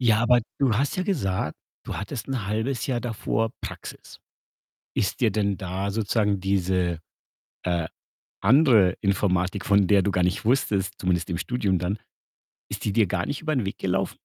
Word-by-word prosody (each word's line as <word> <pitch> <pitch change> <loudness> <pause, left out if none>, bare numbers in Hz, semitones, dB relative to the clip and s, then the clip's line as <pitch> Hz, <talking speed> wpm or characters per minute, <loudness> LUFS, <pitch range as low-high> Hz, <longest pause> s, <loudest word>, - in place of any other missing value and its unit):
Ja, 115 -4 +4
aber 120 0 +5 0.2
du 135 -4 +3
hast 140 +6 0
ja 185 - 0
gesagt, 95 - -1 0.3
du - - -5
hattest 110 +6 -5
'n 120 -7 -2
1/2 110 +3 -1
Jahr 125 -3 0
davor 115 -1 -1
Praxis. - - -8 0.8
Ist 95 - -1
dir 115 -3 +4
denn 100 -1 0
da 95 +2 -3
sozusagen 105 -1 +1
diese, 90 -3 0 0.7
äh, 85 -2 0 0.5
andere 110 - +5
Informatik, 95 -1 +1
von 100 -2 +4
der 100 -2 +5
du 100 - +1
gar 90 -1 +1
nicht 90 +3 0
wusstest 105 -6 +1
zumindest 90 -1 0
im 85 - -1
Studium 100 -4 0
dann, 90 +4 -1 0.7
ist - - -5
die 105 - 0
dir 110 -1 +4
gar 90 0 -1
nicht 145 - -3
über 155 -1 -1
'n 130 -6 0
Weg 95 - -4
gelaufen? 95 0 -1
100 Hz, 175 wpm, -25 LUFS, 95-115 Hz, 0.8 s, aber